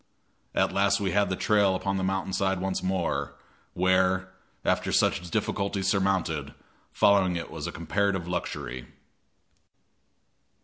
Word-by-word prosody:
At - - +2
last 100 +1 +2
we 100 -2 -1
had 100 0 +2
the 95 - 0
trail 100 -1 +3
upon 95 +1 -1
the 95 - -1
mountain 95 0 -1
side 95 -1 +1
once 95 0 -2
more, 95 -2 -1 0.4
where, 95 +1 +2 0.3
after - - +1
such 90 0 +1
difficulties 100 -1 -1
surmounted, 95 -8 0 0.4
following 95 -3 +3
it 85 - -5
was - - -5
a - - -4
comparative 95 +1 -1
luxury. 65 -8 -4
95 Hz, 130 wpm, -27 LUFS, 90-100 Hz, 0.4 s, trail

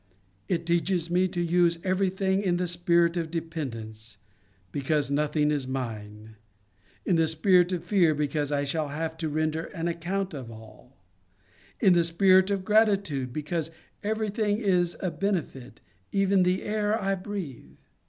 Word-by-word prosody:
It 170 -2 -1
teaches 170 0 0
me 180 +1 +3
to 180 -1 -5
use 170 0 +2
everything 190 +1 +1
in 180 -3 +1
the 180 - 0
spirit 170 0 +2
of 165 -2 -2
dependence, 115 -10 -6 0.5
because 145 0 -1
nothing 150 +1 +1
is 140 -3 -1
mine; 110 -4 -6 0.7
in 175 - +2
the 165 -1 +3
spirit 180 +3 +3
of 180 -3 -2
fear, 175 -7 +3
because 150 0 -1
I 145 -1 +1
shall 150 +2 -2
have 160 +3 -4
to 160 -1 -2
render 155 +2 -1
an 165 -1 -4
account 180 +3 -2
of 130 -5 -7
all; 110 +3 -14 0.8
in 190 -4 +5
the 170 -1 +4
spirit 185 +3 +4
of 195 -2 -1
gratitude, 200 - +2
because 155 +3 -3 0.3
every 215 0 -1
thing 210 -1 0
is 180 -5 +1
a 185 - -1
benefit, 165 - -3 0.3
even 195 -1 +3
the 180 +1 +1
air 210 +1 0
I 195 -2 0
breathe. 175 - -6
170 Hz, 155 wpm, -27 LUFS, 150-190 Hz, 0.8 s, in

